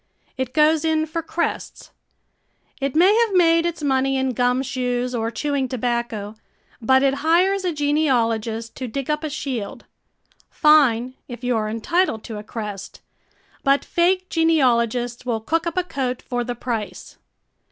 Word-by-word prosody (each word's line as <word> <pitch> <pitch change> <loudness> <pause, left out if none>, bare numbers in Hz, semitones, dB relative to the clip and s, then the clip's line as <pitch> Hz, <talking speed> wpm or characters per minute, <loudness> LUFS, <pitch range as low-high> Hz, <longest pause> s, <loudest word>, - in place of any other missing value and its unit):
It 260 -1 -4
goes 310 +1 +4
in 315 -1 +1
for 325 +2 -4
crests. 335 +1 -4 0.9
It 275 0 -2
may 370 +6 +5
have 430 -4 -2
made 335 -1 +4
its 335 -2 -5
money 270 -1 +1
in 265 0 0
gum 250 +2 +1
shoes 250 -1 -2
or 225 -1 -1
chewing 275 +3 -1
tobacco, 235 -4 -3 0.5
but 260 +4 +4
it 270 -1 +3
hires 365 +5 +3
a 360 - 0
genealogist 235 -7 0
to 255 - -4
dig 275 +5 -3
up 300 +1 -2
a 310 - -2
shield. 265 -8 -5 0.6
Fine, 255 -5 +4
if 245 0 -9
you 245 -1 +1
are 215 -1 -1
entitled 230 +3 0
to 220 -3 -6
a - - -9
crest. 210 -3 -7 0.6
But 275 0 +2
fake 365 +2 +1
genealogists 245 -8 +1
will 240 -3 -1
cook 330 +9 -1
up 335 - -4
a 365 - +2
coat 260 -7 -3
for 245 -1 -2
the 245 0 -4
price. 220 -6 -5
265 Hz, 155 wpm, -22 LUFS, 235-315 Hz, 0.9 s, may